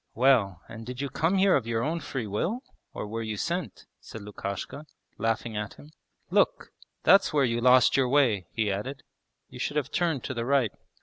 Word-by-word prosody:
'Well, 115 -8 +3
and 115 0 -9
did 125 +2 -7
you 140 0 -2
come 165 +7 +1
here 195 0 +5
of 120 -5 0
your 115 0 0
own 165 +5 -1
free 135 -6 -4
will, 170 - -2 0.3
or - - -5
were 115 +2 -4
you 110 -2 -4
sent?' 170 - -3
said 110 - -10
Lukashka, 105 +8 -6 0.3
laughing 115 +1 -1
at 105 0 -4
him. 150 - -15 0.4
'Look! - - +2 0.3
that's 195 +5 +6
where 145 -3 +4
you 120 -1 0
lost 125 0 +6
your 130 -2 +3
way,' 120 -10 +3
he 110 -3 0
added, 125 +8 -4 0.5
'you 125 - -10
should 145 +3 -2
have 140 -2 -1
turned 165 -7 0
to 130 - -3
the 120 -2 -2
right.' 130 -3 +2
125 Hz, 195 wpm, -27 LUFS, 110-145 Hz, 0.5 s, that's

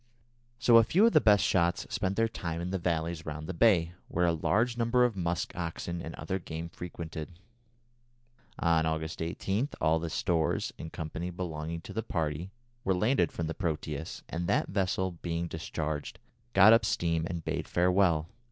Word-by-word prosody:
So 120 -1 +6
a 115 - +8
few 185 - +4
of 230 - +5
the 155 - +6
best 105 -2 +5
shots 85 -1 +2
spent 100 -4 0
their 115 +1 +3
time 85 -7 -4
in 90 +1 -3
the 95 - -1
valleys 85 -1 -1
round 75 0 -5
the 95 - -4
bay, 85 -4 +4
where 90 +1 +1
a 85 - +3
large 110 +9 +1
number 120 +1 +3
of 120 -4 0
musk 85 -2 -2
oxen 85 0 -4
and 80 - -6
other 95 0 -3
game 85 -1 -6
frequented. 85 -1 -7 1.2
On 80 -2 +2
August 80 0 -3
18, 95 - -1
all 80 +1 +3
the 85 0 -3
stores, 80 -1 0
&c., 80 +2 -5
belonging 85 -2 -4
to - - -9
the 110 - -1
party 80 -2 -2 0.3
were 95 - +2
landed 105 - +2
from 85 - -3
the 80 - -3
Proteus, 80 -4 -4
and 85 +1 -3
that 100 - +1
vessel, 95 -2 -1
being 85 0 -2
discharged, 80 -2 -4 0.4
got 100 +3 +8
up 115 -1 +5
steam 85 -4 0
and 85 -2 -5
bade 80 -1 -2
farewell. 90 -3 +3
85 Hz, 175 wpm, -30 LUFS, 80-95 Hz, 1.2 s, a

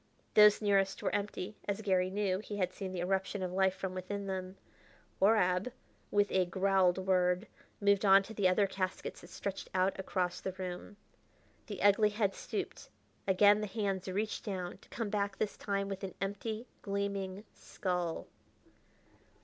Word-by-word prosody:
Those 210 0 +7
nearest 195 -1 +2
were - - 0
empty, 205 0 -3
as 200 +1 -2
Garry 185 -3 +2
knew; 190 -1 0
he 210 0 -6
had 185 -2 0
seen 190 -1 -5
the 180 -2 -3
eruption 190 +2 -1
of 180 - -2
life 190 0 +2
from 190 -1 -4
within 195 +2 -4
them. 190 0 -4 0.6
Horab, 195 +1 +3 0.4
with 205 0 +2
a 185 -1 +3
growled 190 0 +3
word, 185 0 +2 0.3
moved 200 0 +3
on 195 -1 +7
to 220 - -9
the 200 -3 +2
other 185 +3 +4
caskets 185 -1 -3
that 175 - -13
stretched 195 0 -5
out 185 +1 +2
across 180 -2 -1
the 190 - -3
room. 185 +2 -6 0.7
The 205 -3 -5
ugly 205 +1 +5
head 205 -2 0
stooped; - - -5 0.4
again 205 +2 +5
the 210 - -2
hands 195 -2 -2
reached 205 +3 -2
down, 185 -4 -4
to - - -21
come 225 -4 -3
back 200 -1 -1
this 210 - -1
time 200 -1 -2
with 195 0 -5
an 190 -2 -5
empty, 215 +4 -3 0.2
gleaming 200 -1 -3
skull. 180 -3 -3
195 Hz, 165 wpm, -33 LUFS, 185-205 Hz, 0.7 s, Those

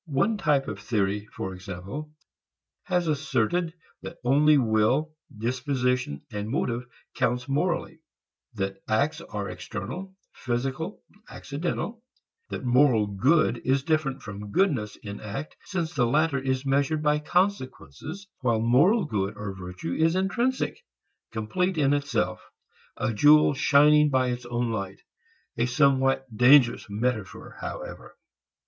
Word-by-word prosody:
One 170 +9 +1
type 150 -7 +2
of - - -5
theory, 105 -3 -1
for 95 -2 -6
example, 95 +11 -7 0.7
has 180 -2 0
asserted 155 +3 0 0.3
that 170 - -8
only 145 +4 +5
will, 125 +6 +2 0.2
disposition, 125 - -1
motive 115 +3 -2 0.3
counts 125 +1 0
morally; 165 +3 -1 0.6
that 95 -1 -3
acts 150 +9 +1
are 105 -10 -5
external, 185 - -6 0.2
physical, 135 - -3 0.3
accidental; 175 +10 -4 0.5
that - - -5
moral 125 -3 +4
good 120 - +2
is 135 +1 +1
different 150 -4 0
from 105 0 -7
goodness 125 - +1
in 100 0 -8
act 120 +8 -6
since 175 -3 -3
the 125 -5 +2
latter 150 +2 +2
is 130 0 -2
measured 140 +3 +1
by 150 0 +3
consequences, 175 - -2
while 120 -4 +1
moral 150 - +4
good 105 -5 -2
or 105 -1 -5
virtue 90 -2 -6
is 165 +2 +2
intrinsic, 240 - -1 0.5
complete 170 - -1
in 145 -2 +3
itself, 115 -10 -1 0.6
a 110 - -1
jewel 150 +6 +6
shining 150 +2 +5
by 130 -2 +2
its 120 0 -4
own 120 -1 -1
light 95 -3 -4 0.6
a 120 +1 +1
somewhat 135 0 +3
dangerous 125 +1 +5
metaphor 110 -2 -3
however. - - -7
135 Hz, 125 wpm, -26 LUFS, 110-155 Hz, 0.7 s, jewel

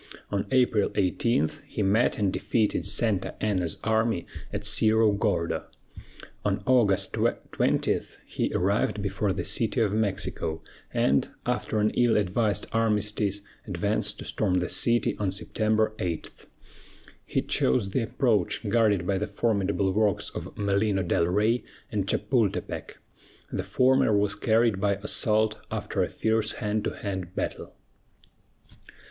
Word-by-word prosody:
On 100 -1 -1
April 125 -5 +3
18 95 -2 +1 0.2
he - - -2
met 105 +5 +2
and 100 -3 0
defeated 110 -4 0
Santa 105 -1 0
Anna's 95 -5 -1
army 110 -4 +1 0.3
at - - -4
Cerro 110 0 +4
Gordo. 100 -5 -1 0.8
On - - -1
August 105 -7 +3 0.4
20 - - +1 0.3
he - - -2
arrived 100 +2 +1
before 100 +1 -1
the - - -2
City 115 +2 0
of 105 -3 +2
Mexico, 95 -6 -1 0.3
and, 70 +1 +2 0.2
after 110 - -1
an 105 +1 +2
ill 120 -3 +3
advised 105 +2 +1
armistice, 105 -2 0 0.3
advanced 100 +2 -1
to - - -8
storm 95 -4 0
the 90 -2 0
city 120 -2 +1
on 100 -3 0
September 110 +2 0
8. 85 -3 -5 0.8
He - - -1
chose 80 +10 +1
the 130 - +1
approach 110 -3 0
guarded 105 -5 +2
by 95 0 0
the 105 - -2
formidable 100 -3 0
works 105 0 0
of - - -7
Malino 100 -2 +1
del 85 - +2
Rey 105 +6 +1 0.3
and - - -1
Chapultepec. - - -1 0.5
The - - -2
former 130 -4 +3
was 100 0 +1
carried 110 -3 +2
by 100 -1 +2
assault, 105 +1 +2
after - - -2
a - - 0
fierce 110 0 0
hand 105 0 -2
to - - +1
hand 95 -3 -5
battle. - - -4
105 Hz, 135 wpm, -27 LUFS, 95-110 Hz, 0.8 s, Cerro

